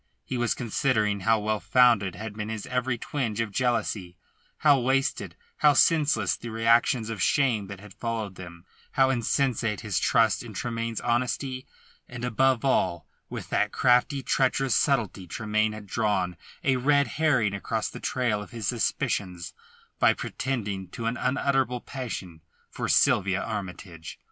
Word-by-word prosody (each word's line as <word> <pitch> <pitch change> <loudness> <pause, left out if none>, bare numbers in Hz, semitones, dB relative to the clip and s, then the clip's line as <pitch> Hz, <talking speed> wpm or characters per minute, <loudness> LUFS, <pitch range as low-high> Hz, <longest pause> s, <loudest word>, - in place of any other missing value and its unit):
He 130 - -4
was 120 -1 0
considering 110 -3 0
how 110 +4 +2
well 105 0 -1
founded 115 -8 +3
had 110 +3 -6
been 105 0 -4
his 110 -2 -4
every 125 -1 -1
twinge 115 -4 -3
of 115 -2 -1
jealousy; 105 -6 -1 0.4
how 145 -3 +5
wasted, 130 - 0 0.2
how 150 -1 +5
senseless 145 - +3
the 120 - -8
reactions 115 +1 +2
of 110 -5 -5
shame 120 -8 +2
that 100 -1 -8
had 105 -1 -13
followed 110 -2 -4
them; 85 -1 -11 0.3
how 135 0 +4
insensate 120 -3 0
his - - -1
trust - - +3
in - - -10
Tremayne's 115 -1 -3
honesty, 130 +2 -1 0.4
and, 120 0 -5
above 130 +1 +2
all, 85 - +1 0.2
with - - -7
what - - +1
crafty, 125 +3 +3
treacherous 130 -1 +1
subtlety 110 -8 +1
Tremayne 110 +1 0
had 105 -1 -9
drawn 100 -4 0 0.3
a 130 -2 +2
red 140 +2 +3
herring 130 -6 +1
across 100 - -2
the - - -8
trail 120 -5 -1
of 105 - -9
his 115 -5 -5
suspicions 90 -7 -2 0.5
by - - +5
pretending 105 -8 -3
to 115 +6 -7
an 115 +2 0
unutterable 130 -1 0
passion 100 - -6 0.3
for - - -4
Sylvia 95 0 +3
Armytage. 90 -6 -6
115 Hz, 150 wpm, -26 LUFS, 105-130 Hz, 0.5 s, how